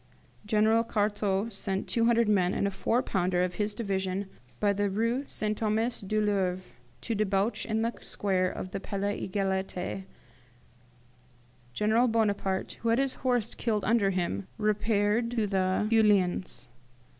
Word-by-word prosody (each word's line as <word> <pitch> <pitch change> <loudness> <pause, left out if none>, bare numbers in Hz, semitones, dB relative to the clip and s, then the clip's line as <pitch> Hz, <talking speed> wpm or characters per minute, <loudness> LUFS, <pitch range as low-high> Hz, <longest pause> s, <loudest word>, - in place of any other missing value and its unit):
General 220 +2 +3
Cartaux 205 -2 0
sent 195 -2 -3
two 230 -1 +1
hundred 235 -1 +3
men 190 -3 +2
and - - 0
a 200 - 0
four 230 +6 0
pounder 180 -1 +1
of 180 0 -1
his 210 0 -1
division 195 -2 -2 0.3
by 205 -1 +3
the 205 0 0
Rue 230 +6 0
St. 215 0 -1
Thomas 220 +2 0
du 215 +2 -1
Louvre 190 -3 0 0.4
to 230 - -2
debouch 205 +1 0
in 220 0 0
the 230 +1 0
square 185 -2 0
of 185 - -6
the - - -3
Palais 200 0 -3
Egalite. 190 -1 -2 1.7
General 220 +4 +3
Bonaparte, 205 -4 0
who 230 - 0
had 230 - +3
his 270 0 +1
horse 245 -4 0
killed 215 -5 -1
under 215 -2 +3
him, 170 - -2
repaired 215 +1 +1
to 230 -3 0
the 190 0 +1
Feuillans. 200 - +2
205 Hz, 145 wpm, -29 LUFS, 190-225 Hz, 1.7 s, General